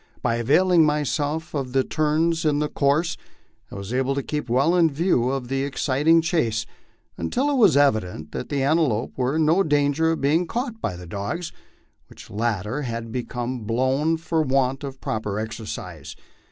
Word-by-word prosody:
By 115 -1 +1
availing 165 +8 +4
myself 150 +1 -1
of 135 -4 -3
the 135 -1 +3
turns 160 +3 +1
in 150 -2 +2
the 150 0 0
course, 150 +4 +1 0.5
I - - -10
was 100 +3 -6
able 130 +1 0
to 140 - -2
keep 150 -4 -4
well 140 +8 +3
in 170 -2 +4
view 140 -5 +1
of 135 -2 -3
the 135 +1 -1
exciting 145 +4 +2
chase, 115 -10 0 0.5
until 260 - 0
it 280 - +1
was 200 - +5
evident 100 - +1
that - - -5
the 140 -2 0
antelope 140 -6 +1
were 130 +2 0
in 160 -1 +2
no 165 +5 +4
danger 150 0 +2
of - - -4
being 155 +6 +2
caught 235 0 -4
by 90 - -2
the 90 0 -9
dogs, 100 - -4 0.6
which - - -14
latter 110 +4 -2
had 115 -3 -5
become 125 +1 -4
blown 130 +8 +1
from 160 -2 -1
want 135 +1 +1
of 135 -1 -6
proper 105 -2 -3
exercise. 90 -9 -6
140 Hz, 175 wpm, -23 LUFS, 120-160 Hz, 0.6 s, was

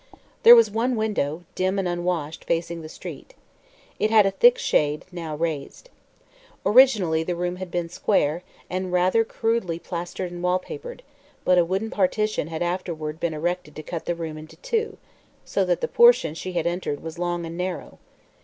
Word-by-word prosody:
There 235 - +10
was 230 -3 +5
one 235 +4 0
window, 180 -8 -1
dim 185 +1 0
and 195 -2 0
unwashed, 175 -3 -3
facing 170 0 -2
the 155 - -9
street. - - -10 0.6
It 215 - +2
had 215 -2 +6
a 195 - +2
thick 485 - +5
shade, 150 - 0
now 165 -3 -5
raised. 160 - -4 0.7
Originally 205 -8 +5
the 175 +2 -2
room 175 +1 -2
had 185 -1 -6
been 175 -1 -2
square, 165 -2 0 0.3
and 185 0 -3
rather 185 +5 +3
crudely 225 -6 -1
plastered 175 +1 -5
and 175 0 -7
wallpapered, 450 - -3 0.4
but 180 -1 +5
a - - +5
wooden 195 +5 -2
partition 215 -2 0
had 160 +1 -3
afterward 165 -3 -3
been 170 -2 -1
erected 170 -1 -3
to 155 - -7
cut 165 +1 -6
the 175 - -1
room 160 -2 -6
into 155 +1 -12
two, 440 - -2 0.5
so - - 0
that - - 0
the 480 - 0
portion 475 - +5
she 185 +3 -6
had 175 - -1
entered 170 -4 -2
was 165 +1 -7
long 175 -1 -2
and 165 0 -7
narrow. 180 0 -5
180 Hz, 175 wpm, -24 LUFS, 165-210 Hz, 0.7 s, There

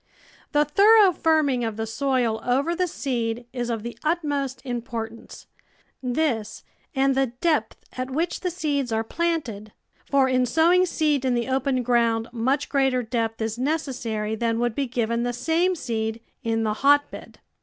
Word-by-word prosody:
The 295 0 +3
thorough 405 +5 +6
firming 310 -7 +2
of 225 -2 -3
the 225 - -2
soil 235 -1 0
over 275 +7 +1
the 365 +1 0
seed 240 -6 -3
is 245 -2 -3
of 225 -3 -2
the 235 -1 -6
utmost 290 -5 -1
importance 230 -2 -6 0.3
— - - -34 0.2
this 245 -5 -1 0.3
and 270 0 +3
the 270 0 +2
depth 305 -10 0
at 255 0 -3
which 320 +6 -1
the 365 - -2
seeds 290 -7 -2
are 220 0 0
planted 240 -8 -3 0.2
— - - -37
for 275 -2 +4
in 255 -1 +2
sowing 345 +7 +4
seed 300 -5 +1
in 255 -2 +1
the 240 0 -1
open 265 -1 0
ground 230 -1 +1
much 260 +5 0
greater 265 -3 +1
depth 225 -1 -2
is 220 +1 -3
necessary 250 -7 -2
than 230 +1 0
would 240 -1 0
be 275 +3 -1
given 235 -1 -1
the 245 0 -1
same 335 +8 +1
seed 225 -6 -3 0.2
in 225 0 0
the 215 -1 0
hotbed. 285 +1 +2
255 Hz, 165 wpm, -24 LUFS, 230-290 Hz, 0.3 s, thorough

